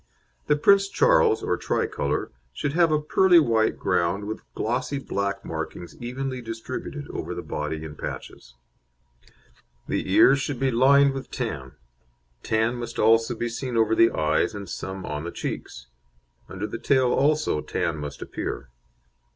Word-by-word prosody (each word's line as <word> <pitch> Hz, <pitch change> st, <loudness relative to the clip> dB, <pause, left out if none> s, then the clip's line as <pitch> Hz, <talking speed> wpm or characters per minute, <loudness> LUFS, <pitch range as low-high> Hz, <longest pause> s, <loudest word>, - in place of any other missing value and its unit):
The 150 Hz, -, +4 dB
Prince 195 Hz, +6 st, +5 dB
Charles, 470 Hz, -, +3 dB
or -, -, +1 dB
Tricolour, -, -, -1 dB, 0.2 s
should 145 Hz, -1 st, -2 dB
have 170 Hz, -1 st, +4 dB
a 155 Hz, -, +3 dB
pearly 175 Hz, +4 st, +5 dB
white 115 Hz, -7 st, +2 dB
ground 90 Hz, +4 st, 0 dB
with 110 Hz, +1 st, -5 dB
glossy 125 Hz, +5 st, -1 dB
black 100 Hz, -6 st, -3 dB
markings 85 Hz, -2 st, -6 dB
evenly 130 Hz, +1 st, -4 dB
distributed 115 Hz, -1 st, -6 dB
over -, -, -5 dB
the -, -, -5 dB
body 75 Hz, +1 st, -4 dB
in 80 Hz, -2 st, -7 dB
patches. -, -, -8 dB, 1.3 s
The -, -, -2 dB
ears 135 Hz, +1 st, +6 dB
should 135 Hz, -2 st, -3 dB
be 135 Hz, -1 st, +1 dB
lined 140 Hz, +3 st, +5 dB
with 135 Hz, 0 st, -6 dB
tan; 70 Hz, -, -4 dB, 0.7 s
tan 110 Hz, +2 st, 0 dB
must 120 Hz, -1 st, -6 dB
also 115 Hz, +2 st, +3 dB
be 120 Hz, -, -2 dB
seen 120 Hz, +1 st, -4 dB
over 110 Hz, -1 st, +3 dB
the 115 Hz, +1 st, +6 dB
eyes, 80 Hz, +7 st, 0 dB
and 100 Hz, -1 st, -6 dB
some 95 Hz, +2 st, -6 dB
on 75 Hz, 0 st, -4 dB
the 85 Hz, -, -4 dB
cheeks. -, -, -6 dB, 0.6 s
Under 95 Hz, +2 st, -4 dB
the 115 Hz, -, -5 dB
tail 130 Hz, -2 st, +3 dB
also 150 Hz, -, +2 dB
tan -, -, -2 dB
must 75 Hz, -1 st, -6 dB
appear. -, -, -5 dB
115 Hz, 150 wpm, -25 LUFS, 100-140 Hz, 1.3 s, ears